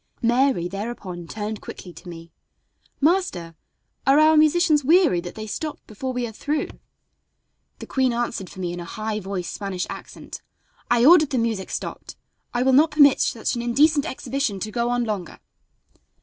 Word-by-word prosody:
Mary 240 -6 +2
thereupon 195 -3 -6
turned 215 +1 -5
quickly 180 - -9
to 175 +3 -12
me: 165 -1 -10 0.7
"Master, 295 - 0 0.5
are 270 +1 +6
our 310 +1 +6
musicians 310 -1 +4
weary 315 - +4
that 175 0 -8
they 215 -1 -6
stop 300 +8 -4
before 255 +5 -5
we 250 -1 -2
are 230 - -6
through?" 290 +7 -2 1.1
The - - -9
queen 260 -2 +1
answered 235 -5 -3
for 190 - -12
me 175 -2 -3
in 175 - -6
a - - -5
high 215 +4 -4
voiced 190 -3 -5
Spanish 195 -3 -3
accent: - - -9 0.5
"I 240 0 +4
ordered 310 -1 +7
the 265 - -1
music 225 -5 -1
stopped; - - -6 0.4
I 245 - 0
will 265 0 +3
not 300 +5 +6
permit 285 -3 +5
such 225 - 0
an 240 - -3
indecent 285 +5 +3
exhibition 260 -6 -3
to 215 - -4
go 235 +1 -1
on 245 0 +1
longer." 210 -6 -4
235 Hz, 170 wpm, -23 LUFS, 195-280 Hz, 1.1 s, ordered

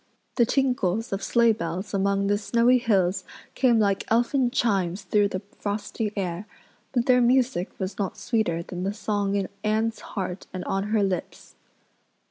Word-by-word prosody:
The 235 -3 +3
tinkles 235 -5 0
of 195 - -2
sleigh 235 +1 +4
bells 180 +1 -4
among 200 0 +1
the 205 +1 +1
snowy 235 +4 +3
hills 195 -5 +1 0.3
came 245 -3 +3
like 200 -3 +2
elfin 245 +2 +2
chimes 195 -7 0
through 205 +2 +2
the 190 0 -5 0.2
frosty 205 +1 -3
air, 185 0 -3 0.4
but 240 -2 +1
their 250 -1 +5
music 245 -6 +2
was 190 +2 -4
not 195 -2 -2
sweeter 175 -8 0
than 180 +1 -6
the 200 +2 -2
song 205 -2 -1
in 195 -2 0 0.2
Anne's 220 +1 0
heart 185 -2 -5
and 185 -1 -5
on 195 +1 -1
her 210 0 +1
lips. 185 -3 -4
205 Hz, 160 wpm, -25 LUFS, 190-235 Hz, 0.4 s, their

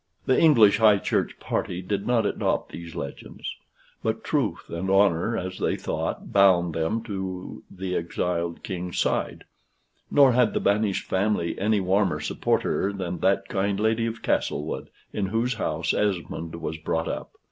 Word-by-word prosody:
The 130 - +3
English 115 -11 +6
High 110 -2 +6
Church - - -1
party 90 +1 -2
did 100 +1 -2
not 120 -2 +2
adopt - - -1
these 85 -1 -8
legends. - - -6 0.5
But 110 0 -2
truth 125 - -1
and 85 +3 -3
honor, 95 +2 +3
as 95 -1 -5
they - - +1
thought, - - -4
bound 90 -4 +5
them 80 +8 -1
to 95 -4 -5
the 95 -1 -4
exiled 85 0 -2
king's 90 -2 -4
side; - - 0 0.7
nor 140 -2 +6
had 125 -2 +3
the - - +2
banished 100 -1 +1
family 95 -2 0
any 105 +1 +2
warmer 95 -4 +1
supporter 95 +5 0
than 90 -3 -4
that 95 +3 +2
kind 100 0 -1
lady 110 +1 +1
of 115 0 -6
Castlewood, 75 +2 -1 0.2
in 100 -2 -1
whose 115 +5 0
house 80 -7 -1
Esmond 85 -5 -2
was 80 -1 -4
brought 80 +1 -1
up. - - -5
95 Hz, 155 wpm, -25 LUFS, 85-110 Hz, 0.7 s, English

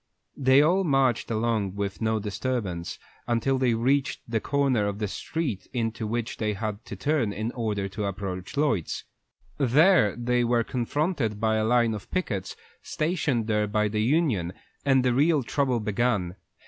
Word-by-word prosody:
They 135 +1 +5
all 180 +5 +3
marched 135 - +2
along 110 -4 0
with 100 0 -3
no 110 0 +1
disturbance 105 -4 -3 0.3
until 125 +3 +1
they 125 -3 +2
reached 135 +4 +1
the 115 -1 0
corner 135 -5 +1
of 100 0 -3
the 105 -1 -2
street 125 - -4
into 115 -2 -2
which 115 +1 -3
they 105 -1 -1
had 105 +1 -4
to - - -7
turn 130 0 0
in 110 +3 -3
order 105 -5 -2
to 105 +1 -4
approach 95 +1 -5
Lloyd's. 115 - 0 0.6
There 140 - +4
they 120 0 +1
were 120 0 +2
confronted 125 - -1
by 110 0 +2
a 110 - +1
line 120 -1 +3
of 105 -2 -7
pickets, 105 - -2 0.3
stationed 155 -8 -1
there 105 -1 +1
by 105 0 +1
the 105 +1 -1
union, 115 - +1 0.3
and 135 -2 +3
the 125 - +3
real 145 +2 +3
trouble 130 0 0
began. 105 -4 0
115 Hz, 160 wpm, -26 LUFS, 105-135 Hz, 0.6 s, They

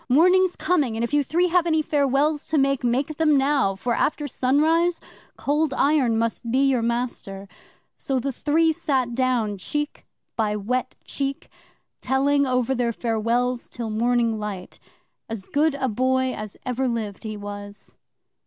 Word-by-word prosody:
"Morning's 365 +6 +4
coming, 285 -11 0
and 230 - -1
if 235 - -3
you 295 -1 +3
three 350 +6 +1
have 350 0 +2
any 315 -1 +2
farewells 290 +1 +1
to 315 - 0
make, 275 -2 +2
make 265 +5 0
them 305 -3 +4
now, 270 -7 +2
for, 240 +5 -2
after 295 +4 0
sunrise, 315 +7 +2 0.4
Cold 295 -1 0
Iron 270 -6 +2
must 230 +1 -2
be 265 +4 +3
your 260 -3 +2
master." 230 -4 -3 0.5
'So 270 -1 -1
the 275 +3 -2
three 320 +5 +2
sat 260 -5 -1
down, 235 -5 0
cheek 295 +9 -4 0.3
by 215 -2 0
wet 250 +5 -2
cheek, 275 -1 -4 0.5
telling 280 +2 +2
over 255 0 +1
their 240 -2 0
farewells 235 +2 -1
till 230 -3 -5
morning 230 0 +1
light. 200 -3 -6 0.5
As 220 -4 -5
good 295 0 +1
a 270 -2 -1
boy 260 +2 +1
as 215 -1 -7
ever 255 +1 -1
lived, 220 -5 -3
he 215 -1 -5
was. 205 0 -8
255 Hz, 155 wpm, -23 LUFS, 230-290 Hz, 0.5 s, Morning's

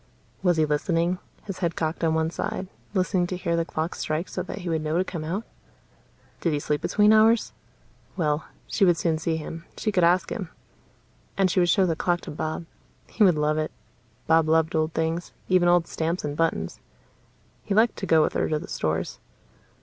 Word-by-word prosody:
Was 180 -3 +3
he 155 - +4
listening, 165 +4 0 0.2
his 195 -3 -6
head 170 -3 -1
cocked 160 +1 -2
on 160 -1 +2
one 160 0 +1
side, 185 - -3 0.3
listening 185 -1 +1
to 180 - -3
hear 170 -2 -1
the 165 - +1
clock 165 +1 -3
strike 155 +3 -3
so - - -3
that - - -6
he 180 -3 -6
would 160 -1 0
know 155 +1 -1
to 180 - +3
come 170 -4 -5
out? 185 +8 -2 1.0
Did 165 - 0
he 145 - 0
sleep 150 0 -1
between 210 +1 +4
hours? 220 +1 +4 0.6
Well, 150 -3 0 0.2
she 205 - 0
would 175 -3 +5
soon 165 -2 0
see 160 0 -1
him: 165 +1 -7
she 215 - -1
could 180 -3 +2
ask 175 +1 +3
him. 195 -8 -4 0.9
And 190 -2 +3
she 185 - +2
would 175 -1 +3
show 190 +2 +4
the 165 -3 0
clock 175 +1 0
to - - -8
Bob. 155 +2 -4 0.5
He 220 - +3
would 180 -5 +6
love 150 +1 +1
it; 155 - -2 0.5
Bob 160 -1 +4
loved 160 0 +3
old 155 0 +1
things, 165 +1 -1 0.2
even 180 -1 +4
old 175 -1 +4
stamps 165 +3 -2
and 145 0 -3
buttons. 150 - -1 0.8
He 200 - -2
liked 225 +2 +4
to - - -4
go 160 -1 +5
with - - 0
her - - 0
to 155 - +1
the 175 +6 -7
stores. 80 - -2
165 Hz, 205 wpm, -25 LUFS, 155-185 Hz, 1.0 s, would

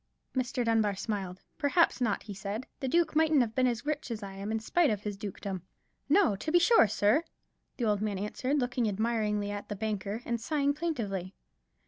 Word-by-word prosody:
Mr. 255 -1 0
Dunbar 220 -3 +2
smiled. 190 -3 -4 0.2
"Perhaps 310 -1 +3
not," 220 -4 0
he 210 - -7
said; 200 +5 -4
"the 265 - -2
duke 335 +3 +2
mightn't 315 -2 +4
have 230 -2 -1
been 255 +1 +3
as 235 0 -2
rich 300 -2 -2
a - - -1
man - - -4
as 210 - -11
I 195 -1 -6
am 200 +2 -5
in 220 - 0
spite 320 +9 +2
of 210 -3 -1
his 210 -1 -3
dukedom." 195 -2 -5 0.5
"No, 330 - +4
to 310 - -3
be 350 - +6
sure, 345 - +6
sir," 215 +8 +3 0.5
the 240 - -1
old 210 -2 +1
man 210 -2 -1
answered, 255 +8 -1
looking 245 -3 0
admiringly 210 -1 0
at 205 0 -6
the 205 - -3
banker, 210 +1 -3
and 235 -1 -2
sighing 285 +2 +1
plaintively. 220 - -3
220 Hz, 205 wpm, -30 LUFS, 205-265 Hz, 0.5 s, be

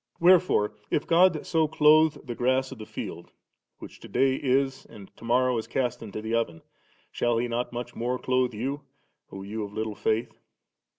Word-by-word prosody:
Wherefore 170 - +4 0.2
if 150 - 0
God 170 -1 +3
so 160 -2 +2
clothe 155 +1 +4
the 120 - -4
grass 130 +2 0
of 130 - -9
the 110 - -8
field - - -7 0.5
which - - -12
to - - -11
day 135 0 +2
is, 135 0 0
and 100 -4 -14
to - - -16
morrow 125 +1 +2
is 110 - -7
cast 125 -2 -2
into 110 -1 -7
the 110 +1 -3
oven, 85 -9 -1 0.5
shall 120 -1 0
He 120 +1 0
not 120 +1 -2
much 120 0 -6
more 125 +2 -1
clothe 125 -2 0
you, 135 +6 -3 0.5
O 95 - -8
ye 105 +3 -5
of 100 0 -8
little 110 0 -3
faith"?' 110 +3 -2
125 Hz, 185 wpm, -26 LUFS, 110-135 Hz, 0.5 s, Wherefore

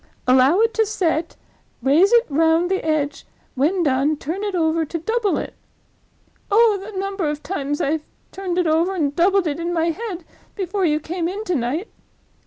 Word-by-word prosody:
'Allow 260 +9 +5
it 455 +1 +2
to 445 - +3
set, 340 -6 -1 0.5
raise 310 +9 +4
it 475 0 +5
round 325 +4 +2
the 380 - 0
edge; 295 -2 -1 0.3
when 330 +8 +1
done, 285 +1 +1
turn 335 +8 -4
it 405 -2 -2
over 325 -1 +1
to 320 +2 -4
double 440 +4 0
it.'—Oh, 430 -1 -2
the 400 -2 -6
number 390 -4 -2
of 295 0 -5
times 290 -6 -3
I 310 +3 0 0.3
turned 370 -2 -4
it 360 - +2
over 330 +4 +1
and 290 -5 -1
doubled 380 +3 +3
it 305 0 -2
in 340 +1 -2
my 335 -1 +1
head, 370 -3 -6 0.3
before 385 0 -1
you 305 -2 +2
came 335 +2 -3
in 395 +4 -4
to 365 - -2
night! 280 - -2
340 Hz, 180 wpm, -21 LUFS, 305-390 Hz, 0.5 s, Allow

